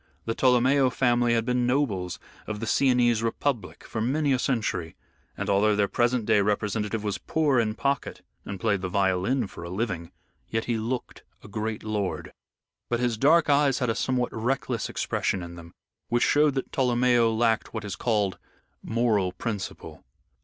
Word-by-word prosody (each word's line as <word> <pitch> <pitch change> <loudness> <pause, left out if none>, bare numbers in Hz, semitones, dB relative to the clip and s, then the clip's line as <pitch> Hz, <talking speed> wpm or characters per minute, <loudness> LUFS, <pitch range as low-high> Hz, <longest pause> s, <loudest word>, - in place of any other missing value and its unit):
The 115 - -1
Tolomeo 130 +2 +4
family 120 -1 +2
had 115 -1 0
been 125 0 +1
nobles 110 -10 0 0.3
of 110 -1 -4
the 115 - -3
Sienese 120 -1 +3
Republic 115 +1 -2
for 110 - -4
many 140 +4 +1
a 130 - +1
century, 105 -11 -1 0.4
and - - -3
although 105 +2 +3
their 100 -1 +2
present 120 +1 +1
day 105 - +4
representative 105 +1 -1
was 105 -2 -2
poor 150 -5 +1
in 110 -2 0
pocket 140 +2 -2 0.2
and 100 -1 -6
played 100 -2 +1
the 90 - -3
violin 100 +6 +1
for 90 - -10
a 85 - -6
living, 95 -4 -3 0.4
yet 115 0 -1
he 115 -2 -1
looked 120 +3 -4 0.2
a - - -11
great 110 +1 -4
lord. 105 -3 -3 0.6
But 120 - 0
his 120 -2 +1
dark 155 +8 +4
eyes 140 -2 +3
had 125 -3 0
a - - -3
somewhat 125 -2 -1
reckless 120 0 -2
expression 95 -3 -1
in 85 0 -8
them, 85 -1 -11 0.4
which 120 0 +2
showed 145 -1 +3
that 135 - -3
Tolomeo 120 -2 +3
lacked 110 0 +1
what 110 -2 -5
is 100 - -4
called 105 -5 0 0.4
moral 110 -5 +1
principle. 100 +1 -6
115 Hz, 170 wpm, -26 LUFS, 105-125 Hz, 0.6 s, Tolomeo